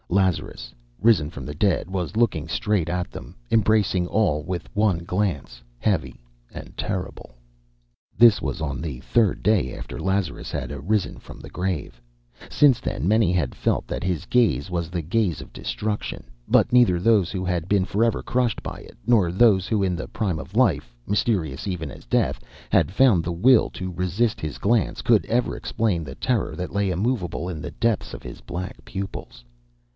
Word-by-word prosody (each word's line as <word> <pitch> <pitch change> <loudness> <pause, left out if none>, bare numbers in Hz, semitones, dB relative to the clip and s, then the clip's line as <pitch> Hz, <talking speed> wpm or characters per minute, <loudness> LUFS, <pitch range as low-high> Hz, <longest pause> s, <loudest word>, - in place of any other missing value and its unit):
Lazarus, 85 -10 0 0.3
risen 100 -9 +4
from 70 -5 -8
the 75 - -5
dead, 90 +3 +1
was 95 +2 -3
looking 90 -10 +1
straight 90 -1 0
at 90 0 -2
them, - - -10 0.2
embracing 105 -5 +3
all 90 -8 +1
with 85 +1 -4
one 100 -5 +1
glance, 90 -10 -2 0.2
heavy - - -1 0.3
and - - -10
terrible. 90 -9 -5 0.8
This 115 -2 +7
was - - -3
on 70 -3 -3
the 75 -7 -5
third 110 +1 +1
day 105 -1 +2
after - - -7
Lazarus 95 -5 -2
had - - -4
arisen 90 +9 -1
from - - -12
the - - -11
grave. 90 -9 -3 0.5
Since 140 -5 +4
then 75 - -2
many 110 -3 +3
had 90 -2 0
felt - - 0
that - - -4
his 90 -3 -1
gaze 95 - +2
was 85 -2 -2
the 85 -2 -3
gaze 90 0 0
of - - -11
destruction, 105 0 -4 0.2
but - - +3
neither 120 -8 +5
those 100 -2 +3
who 95 -2 -3
had 90 -1 -2
been 100 -2 +3
forever 115 +4 +1
crushed 125 -3 0
by - - -6
it, - - -14
nor 105 -8 +3
those 95 -1 +4
who 105 -3 +1
in 90 -2 +1
the 80 - -5
prime 95 -8 -2
of - - -10
life - - +2
(mysterious 95 - 0
even 80 -6 -3
as - - -12
death) - - 0 0.3
had - - +3
found 100 -5 +4
the 85 - -2
will 115 +8 +4
to 95 -1 -6
resist 95 +7 0
his 75 -2 -4
glance, 110 -2 +1
could - - +4
ever 120 +2 0
explain 100 -7 -1
the 65 -3 -8
terror 125 - -1
that 90 0 -5
lay 100 -1 +1
immovable 90 -2 -1
in 85 -4 -5
the 75 - -6
depths 115 -3 -1
of - - -11
his - - -9
black 90 +1 -6
pupils. 95 -10 -7
95 Hz, 180 wpm, -24 LUFS, 85-110 Hz, 0.8 s, This